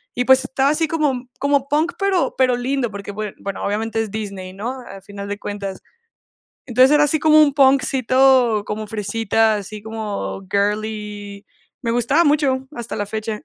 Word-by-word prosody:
y 245 - +1
pues 265 +1 +5
estaba 270 +1 +1
así 315 +2 +1
como 285 -6 -1
como 280 -1 +1
punk, 310 +4 +1
pero 395 -3 +1
pero 255 -1 +3
lindo, 245 -1 -1
porque 200 0 -7
bue 210 0 -5
bueno, 200 0 -5
obviamente 225 +2 -1
es 220 - -4
Disney, 195 -3 -6
¿no? 240 +7 -5
Al 195 0 -10
final 200 0 -8
de 205 0 -4
cuentas. 200 -2 -6 0.9
Entonces, 255 +3 +5
era 295 0 +5
así 295 +1 +1
como 310 0 +6
un 285 -2 +4
punkcito 260 -4 +3
como 215 +1 -4
fresita, 220 +1 +1
así 210 +1 -6
como 215 -3 -5
girly. 205 0 -3 0.3
Me 230 -2 -2
gustaba 270 +8 +2
mucho, 280 -3 +1
hasta 235 -1 -6
la 205 - -2
fecha. 215 +2 -4
225 Hz, 170 wpm, -20 LUFS, 205-270 Hz, 0.9 s, como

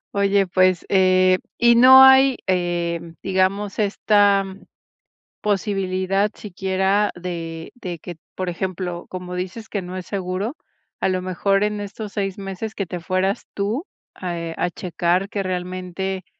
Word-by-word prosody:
Oye, 200 0 +3
pues, 185 -1 +2
eh, 185 -1 +4 0.2
y 235 0 +5
no 260 +2 +9
hay, 265 -1 +7
eh, 175 -2 0 0.2
digamos 195 +2 0
esta, 205 -1 +3 0.9
posibilidad 195 -1 0
siquiera 190 +1 0
de 165 -2 -6
de 180 -8 -6
que, 175 +1 -9 0.2
por 185 -1 -3
ejemplo, 180 0 -4
como 180 -1 -6
dices 185 +5 -5
que 200 - -2
no 180 0 -7
es 185 -1 -6
seguro, 195 - -3 0.4
a - - +1
lo 185 -1 0
mejor 195 +2 +1
en 210 0 -1
estos 205 +1 -6
6 195 -2 -3
meses 195 +2 -6
que 195 - -2
te 180 0 -5
fueras 185 +3 -1
tú, 215 - -2 0.3
ah, 175 -2 -5
eh, 165 -1 -4
a 175 - 0
checar 180 +2 -1
que 205 - -2
realmente, 185 0 -4
190 Hz, 145 wpm, -22 LUFS, 180-200 Hz, 0.9 s, no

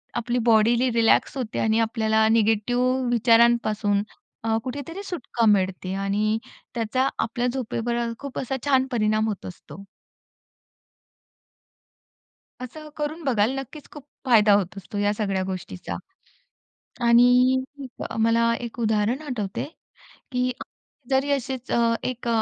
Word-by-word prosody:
आपली 240 +1 -1
बॉडीही 235 +3 +4
रिलॅक्स 230 +4 +3
होते 240 -4 -3
आणि 220 0 +2
आपल्याला 220 -1 +2
निगेटिव्ह 245 +4 +2
विचारांपासून 230 -3 +3 0.4
अ, 225 0 +1
कुठेतरी 285 +9 -6
सुटका 245 - -2
मिळते. 190 -2 +1
आणि 205 +3 0 0.4
त्याचा 240 +3 0
आपल्या 240 +2 -1
झोपेवर 240 -2 -2 0.2
खूप 280 -2 -6
असा 265 +1 -3
छान 265 -2 +3
परिणाम 215 -2 +1
होत 210 -3 -4
असतो. 185 +2 -10 2.8
असं 305 +5 -8
करून 305 +2 -4
बघाल 230 -4 +2
नक्कीच 280 +3 -10
खूप 295 - -11 0.2
फायदा 220 -5 +5
होत 195 -2 0
असतो 200 +1 -7
या 205 0 +1
सगळ्या 195 -3 -1
गोष्टीचा. 95 - -6 1.1
आणि 250 +2 +5 0.6
मला 230 0 +3
एक 235 - -13
उदाहरण 220 +4 +1
आठवते, 220 -9 -4 0.7
की 250 0 0 0.6
जरी 270 +2 +1
असेच 265 -2 -3 0.4
एक 250 -1 -6
230 Hz, 110 wpm, -24 LUFS, 215-255 Hz, 2.8 s, फायदा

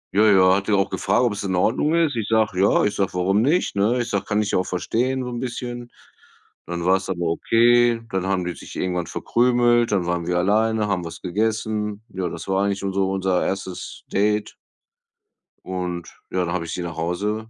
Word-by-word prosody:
Ja, 110 +2 +5
ja, 95 -1 +6
hat 100 0 -2
die 105 - +1
auch 100 -1 +2
gefragt, 120 - +1
ob 120 -4 +2
es 100 - -5
in 95 -2 -1
Ordnung 125 - +2
ist. 165 -5 +2
Ich 110 -3 -2
sage: 110 -4 +1
„Ja." 100 - +4
Ich 105 - +1
sage:„ 95 -2 -1
Warum 95 +3 +2
nicht“, 150 - +1
ne? 110 +5 +2
Ich 120 - -2
sage: 100 - -1
„Kann 105 0 +1
ich 105 - -3
ja - - +2
auch 90 - -1
verstehen 125 +8 -1
so 125 - -4
'n 120 - -4
bisschen.“ 120 -1 -5 0.8
Dann 85 0 -4
war's 95 +1 +2
aber 90 -2 -2
okay, 120 +6 +3
dann 95 0 -1
haben 95 -2 0
die 90 - -3
sich - - -11
irgendwann 90 -2 -2
verkrümelt, 120 -1 +2
dann 95 -4 +1
waren 85 -1 -2
wir 90 0 +1
alleine, 110 +3 +2
haben 90 -3 -1
was 85 - -8
gegessen. 105 +1 -2
Ja, 90 -2 -3
das 85 - -8
war 95 0 +1
eigentlich 100 -1 -2
unser 100 0 -1
unser 95 -1 0
1. 95 -1 -5
Date. 105 +1 +1 1.1
Und, 90 -2 -4 0.2
ja, 95 - 0
da 85 - -3
habe 85 -2 -2
ich 85 - -6
sie 90 - -3
nach 85 -1 -6
Hause 105 +7 -2
100 Hz, 215 wpm, -22 LUFS, 90-115 Hz, 1.1 s, ja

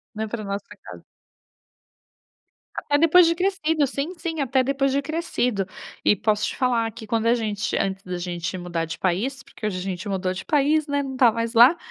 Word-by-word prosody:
né, 220 +1 -3
para 215 0 -5
nossa 200 0 -4 0.2
casa. - - -11 1.7
Até 290 - 0
depois 330 +2 +6
de 335 - +2
crescido. 325 -5 +1
Sim, 280 +6 -3
sim, 325 -3 -3
até 260 0 +2
depois 275 0 +1
de 280 +1 +1
crescido. 250 - -1 0.4
E - - +4
posso 210 +1 0
te - - -5
falar 235 -3 +1
que, 220 - -10
quando 225 +1 0
a 235 - +5
gente 210 -3 -2
antes 195 0 -2
da 180 -1 -4
gente 175 +1 -4
mudar 175 -2 -3
de 165 - -6
país, 220 +10 -1
porque - - -9
hoje 200 -4 -1
a - - -4
gente 185 0 -4
mudou 185 -1 -1
de 185 - -6
país, 300 +1 +2
né, 285 0 0
não 265 -1 -5
está 250 -3 +5
mais 230 +1 -3
lá— 250 +9 +7
235 Hz, 200 wpm, -23 LUFS, 195-285 Hz, 1.7 s, lá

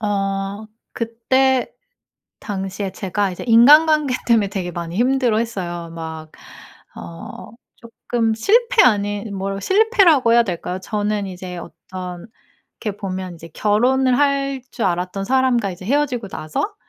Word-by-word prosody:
어 195 +1 -2 0.3
그때 250 +3 +1 0.7
당시에 195 -1 -4
제가 195 0 -2
이제 180 - -7
인간관계 295 +4 +6
때문에 225 -4 +3
되게 185 -3 -4
많이 170 +1 -6
힘들어했어요. 225 -9 0
막 160 -1 -8 0.6
어 85 - -9 0.3
쪼끔 230 -1 -2
실패 465 - +3
아닌 205 -2 +1
뭐라 195 +1 -3
실패라고 380 - +4
해야 235 0 +6
될까요? 180 -1 -4
저는 205 0 -2
이제 180 -1 -7
어떤 180 +1 -8 0.6
이렇게 210 -3 -3
보면 185 -3 -5
이제 165 +1 -12
결혼을 250 +5 +2
할 275 -2 +1
줄 230 - -3
알았던 180 +2 -2
사람과 255 -4 +1
이제 185 +1 -10
헤어지고 260 -4 0
나서 190 - -4
210 Hz, 275 characters per minute, -20 LUFS, 185-255 Hz, 0.7 s, 인간관계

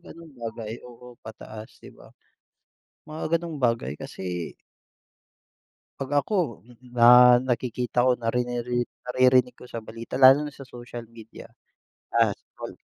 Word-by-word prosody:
gano'ng 165 -2 -13
bagay. 115 -1 -6 0.2
Oo, 125 0 -15
pataas 110 0 -10
'di - - -14
ba? - - -17 1.0
Mga 155 +1 -2
gano'ng 165 -3 -7
bagay 115 - 0
kasi 90 -2 -6 1.5
'Pag 135 +1 -3
ako, 175 - -2 0.3
na 125 +1 +8
nakikita 125 0 0
ko 125 - +4
na 115 -1 -2
riniri 120 0 -1 0.2
naririnig 125 0 +3
ko 125 +1 -15
sa 115 -2 -7
balita, 115 +2 -8
lalo 135 +3 +6
na 145 - -10
sa 135 - -10
social 120 -2 -9
media, 115 -1 -12 0.7
ah, - - +4
example, - - -11
125 Hz, 130 wpm, -25 LUFS, 115-130 Hz, 1.5 s, na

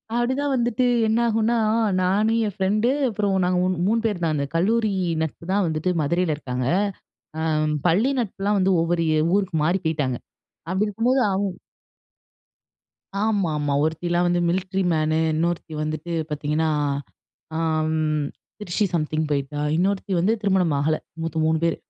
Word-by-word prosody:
அப்படிதான் 260 +4 0
வந்துட்டு 240 0 +1 0.2
என்னாகுனா, 230 0 +2 0.4
நான் 200 +4 +2
என் 205 - -4
ஃப்ரெண்டு 210 +4 +1 0.2
அப்புறம் 205 -2 0
நாங்க 180 0 +1 0.3
3 230 +2 +2
பேர் 205 -5 -1
தான். 160 -2 +1
அந்த 140 -1 -1
கல்லூரி 215 +4 +2 0.3
நட்பு 160 +1 -4
தான் 200 -1 +2
வந்துட்டு 160 +3 -1
மதுரையில 165 +1 +1
இருக்காங்க. 125 -3 -3 0.7
அ - - -2 0.5
பள்ளி 215 +11 +3
நட்புலாம் 205 -2 -1
வந்து 190 0 +3
ஒவ்வொரு 170 0 0
ஏ - - +3 0.2
ஊருக்கு 190 -5 0
மாறி 180 +4 +2
போய்ட்டாங்க. 145 -6 0 0.5
அப்படி 195 +3 +1
இருக்கும்போது 240 +6 +1
அவுங்க 195 -2 -1 1.7
ஆமாம்மா. 160 -10 0
"ஒருத்திலாம் 175 +2 0
வந்து 175 0 +2
மில்ட்ரி 190 +2 -1
மேனு, 155 0 +1 0.2
இன்னொருத்தி 170 0 -1
வந்துட்டு 155 +2 -4 0.2
பார்த்தீங்கன்னா, 150 +2 0 0.9
அ - - -1 0.4
ம் 155 -2 0 0.3
திருச்சி 205 +1 -1
சம்திங் 155 -1 0
போயிட்டா, 145 +1 -2 0.2
இன்னொருத்தி 195 +2 0
வந்து 195 +6 +2
திருமணம் 190 -6 +2
ஆகல. 155 +2 +1 0.3
மொத்தம் 160 -1 -1
3 160 0 +2
பேர். 165 - +1
180 Hz, 135 wpm, -23 LUFS, 155-210 Hz, 1.7 s, பள்ளி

